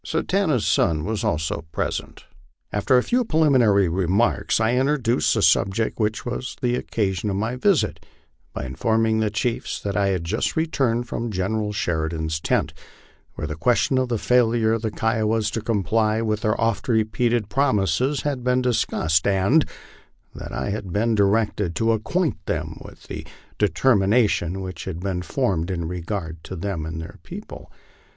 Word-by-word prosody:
Satanta's 165 - 0
son 80 -2 +2
was 110 0 -2
also 80 -9 -1
present. - - -4 0.5
After 105 +5 +3
a 125 - +3
few 250 +1 +1
preliminary 130 - +4
remarks, 95 +9 +1
I 110 +1 +2
introduced 125 - +2
the - - +1
subject 100 +5 +2
which 105 0 -1
was 120 +1 -4
the 125 -2 0
occasion 105 -4 -1
of 95 - -1
my 110 +5 -1
visit, 180 +7 +1 0.5
by - - -5
informing 110 - +1
the 110 -1 +1
chiefs 115 +3 -2
that 100 -1 -3
I 100 -1 +2
had 95 -3 0
just 90 +7 -1
returned 135 -7 0
from 120 -1 -3
General 105 +2 -1
Sheridan's 80 -4 -2
tent, - - 0 0.6
where - - -4
the 75 0 -4
question 125 - +2
of 130 -1 -1
the 120 - 0
failure 115 -1 +3
of 115 - -1
the 110 - -1
Kiowas 110 0 0
to 115 - -3
comply 110 0 +1
with 110 -2 -1
their 110 -1 0
oft 115 -3 0
repeated 115 -1 +1
promises 130 +2 +1
had 140 -4 -2
been 125 0 +2
discussed, 80 -9 +1
and 100 +11 +3 0.6
that - - -8
I - - -2
had 100 -3 -4
been 115 +5 +1
directed 105 -3 +1
to 115 +6 +2
acquaint 140 - -1
them - - -3
with - - -13
the - - -7 0.4
determination 105 -4 +2
which 95 -1 -6
had 90 -3 -5
been 95 -2 -2
formed 95 -6 -1
in 85 -3 -2
regard 85 -2 -5
to 95 - -6
them 85 -3 -3
and 80 0 -5
their 80 - -9
people. - - -10
110 Hz, 160 wpm, -23 LUFS, 95-120 Hz, 0.6 s, preliminary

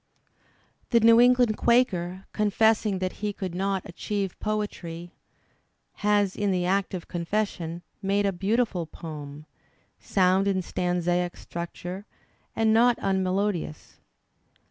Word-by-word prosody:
The 235 - +5
New 230 +1 +7
England 245 -3 +4
Quaker, 190 -7 +1
confessing 210 -1 +2
that 185 0 -3
he 210 -1 0
could 185 -3 -5
not 195 +1 -1
aehieve 195 +1 -3
poetry, 175 -5 -4 0.9
has 205 -2 +2
in 205 -1 0
the 180 -2 +1
act 195 +1 0
of 175 - -7
confession 175 -2 -3 0.2
made 200 +1 +1
a 200 - +2
beautiful 195 -2 0
poem, 150 -2 -8 0.5
sound 190 0 +2
in 190 -2 +1
stanzaic 175 0 -1
structure, 180 +3 -7 0.5
and 220 -1 +3
not 240 +1 +5
immelodious. 190 -3 -1
195 Hz, 115 wpm, -26 LUFS, 175-210 Hz, 0.9 s, New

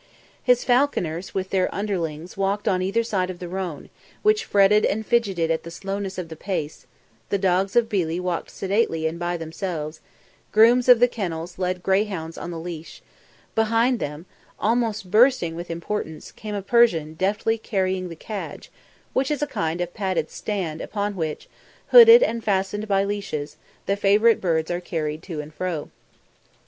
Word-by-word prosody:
His 250 -1 +3
falconers 220 - 0
with 190 -1 -2
their 185 -1 +2
underlings 175 -5 -3
walked 195 +2 -1
on 185 -3 +2
either 200 +5 +1
side 195 -5 -1
of 185 - -6
the 175 - -7
roan, 180 -3 -5 0.3
which 430 +1 +3
fretted 205 +1 +4
and 220 +1 0
fidgeted 195 -9 +1
at 160 - 0
the 170 - -9
slowness 195 +2 -5
of 180 -2 -4
the 160 - -8
pace; 160 -5 -4 0.4
the 200 - +1
dogs 190 +1 +1
of 240 -1 +4
Billi 175 -6 -1
walked 180 -2 -3
sedately 190 -5 0
and 160 +2 -2
by 175 0 -1
themselves; 160 -1 -5 0.5
grooms 240 +3 +5
of 245 -2 +9
the 245 - +7
kennels 175 -6 -5
led 180 -1 -2
greyhounds 190 -4 0
on - - -6
the 170 - -5
leash; 165 -1 -8 0.5
behind 230 +2 +2
them, 150 +3 -5 0.3
almost 220 -4 0
bursting 225 -6 +4
with 175 +1 -7
importance, 165 -1 -5
came 210 -1 -7
a 200 - -3
Persian 190 -9 +3
deftly 210 +6 0
carrying 185 -3 -1
the 165 - -8
cadge, 205 +5 -7 0.4
which 265 +1 +1
is 295 -1 -1
a - - +2
kind 165 - -2
of 175 0 -3
padded 190 -6 -2
stand 180 -7 -3
upon 205 -1 -3
which, 160 -4 -4 0.4
hooded 470 0 +10
and 230 - -1
fastened 205 +1 -1
by 195 -1 +2
leashes, 200 -8 -4 0.3
the 200 - +1
favourite 205 +3 +4
birds 160 -2 0
are 175 +1 -2
carried 155 -3 -3
to 165 -5 -5
and 150 +1 -12
fro. 170 -3 -4
190 Hz, 170 wpm, -23 LUFS, 170-215 Hz, 0.5 s, hooded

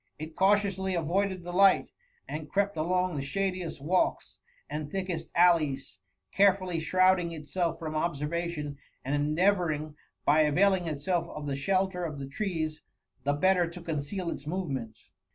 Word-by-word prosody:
It 155 +1 -8
cautiously 190 -1 +2
avoided 185 +3 0
the 175 0 -6
light, 195 +1 +5 0.4
and 150 0 -6
crept 200 0 +1
along 180 +3 0
the 140 - -2
shadiest 185 +2 -2
walks 180 +5 0 0.3
and 150 -1 -4
thickest 185 -4 -3
allies, 155 - +3 0.3
carefully 190 -3 +3
shrouding 185 +1 +3
itself 165 +2 -2
from 160 -2 -5
observation, 155 -1 -2 0.3
and 135 - -1 0.2
endeavourtog, 170 -6 +1 0.3
by 150 +2 +5
availing 180 +4 +3
itself 160 +3 -1
of 150 -1 -7
the 140 -1 -2
shelter 185 +4 0
of 155 -4 -4
the 140 - -5
trees^ 160 0 -3 0.5
the 145 - +2
better 180 +2 +3
to 170 - -9
oHiceal 170 +2 -3
its 145 - -7
movements. 140 - -4
170 Hz, 140 wpm, -29 LUFS, 150-185 Hz, 0.5 s, light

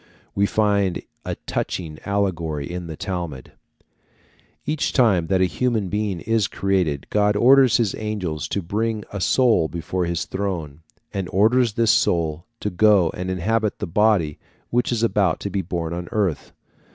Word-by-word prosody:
We 100 +1 +2
find 100 -4 +1 0.2
a - - -3
touching 80 -4 -3
allegory 85 -8 -1
in 90 -1 -5
the 80 - -6
Talmud. 85 -9 -5 1.1
Each 155 0 -1
time 100 - +3
that 95 0 +2
a - - +5
human 110 +1 -1
being 100 -3 -2
is 115 -3 +1
created 90 -8 0
God 105 0 +2
orders 130 +1 +6
his 115 -5 +1
angels 95 -8 -3
to 100 - -2
bring 110 +4 -2
a 100 - -4
soul 115 -3 +3
before 85 +2 -3
his 85 0 -2
throne, 85 -7 -4 0.3
and 95 -4 -3
orders 115 +4 +3
this 115 -2 +3
soul 85 -1 +1
to 105 - -2
go 95 -2 +4
and 90 +1 -5
inhabit 105 +4 0
the - - -3
body 90 -4 +2 0.3
which 120 +1 +1
is 115 -1 0
about 100 -7 +2
to 100 - -4
be 100 - 0
born 85 -2 -3
on 85 0 -5
earth. 100 -7 -1
95 Hz, 160 wpm, -22 LUFS, 85-110 Hz, 1.1 s, orders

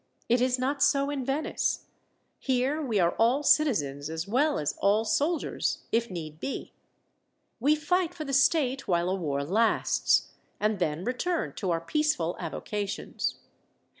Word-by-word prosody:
It 240 +1 +3
is 255 0 +2
not 275 +3 -1
so 280 0 +3
in 280 -2 -3
Venice. 275 +5 -1 0.5
Here 265 +4 0
we 235 -8 0
are 170 -1 +3
all 245 +6 +3
citizens 150 - +2
as 160 +2 -4
well 285 +8 +2
as 150 - -1
all 210 +3 +3
soldiers 290 +10 0
if 235 +1 +1
need 155 -4 -7
be. 275 - -5 0.9
We 290 +6 +4
fight 335 +3 0
for 310 -3 -5
the 275 - -4
state 275 -1 +2
while 175 -1 +1
a - - +1
war 145 -6 -2
lasts, 215 +9 +2 0.3
and 210 -1 0
then 160 -1 -1
return 285 - -1
to 190 - -2
our 165 -1 0
peaceful 180 - 0
avocations. 200 +4 -3
235 Hz, 150 wpm, -28 LUFS, 175-285 Hz, 0.9 s, We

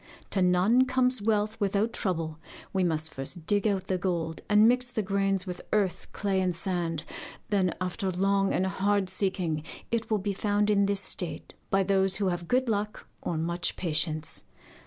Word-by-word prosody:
To 195 - +3
none 185 +8 +4
comes 255 -2 +2
wealth 215 0 0
without 205 +2 +1
trouble: 165 -4 -2 0.3
we 190 -1 +2
must 160 -2 0
first 155 +5 -3
dig 205 +3 +2
out 195 -3 0
the 185 -1 -1
gold 170 -3 -2
and 210 +1 +6
mix 250 0 +3
the 220 -3 -1
grains 195 -1 0
with 180 -2 -6
earth, 200 -4 0
clay, 195 -2 0
and 180 -2 0
sand. 170 -3 -2 0.5
Then, 190 -4 +1
after 185 +2 -2
long 195 +2 +1
and 185 - +1
hard 195 0 +1
seeking, 185 -6 0 0.3
it 230 -1 -1
will 215 - +2
be 200 0 -2
found 205 +1 +1
in 200 -1 +3
this 200 -1 +1
state, 180 -3 -2 0.2
by 195 0 +3
those 190 0 +3
who 195 -2 +1
have 175 -1 -3
good 255 +1 +2
luck 210 -1 -2 0.2
or 165 - -2
much 170 +1 -1
patience. 155 -2 -2
195 Hz, 180 wpm, -28 LUFS, 180-205 Hz, 0.5 s, and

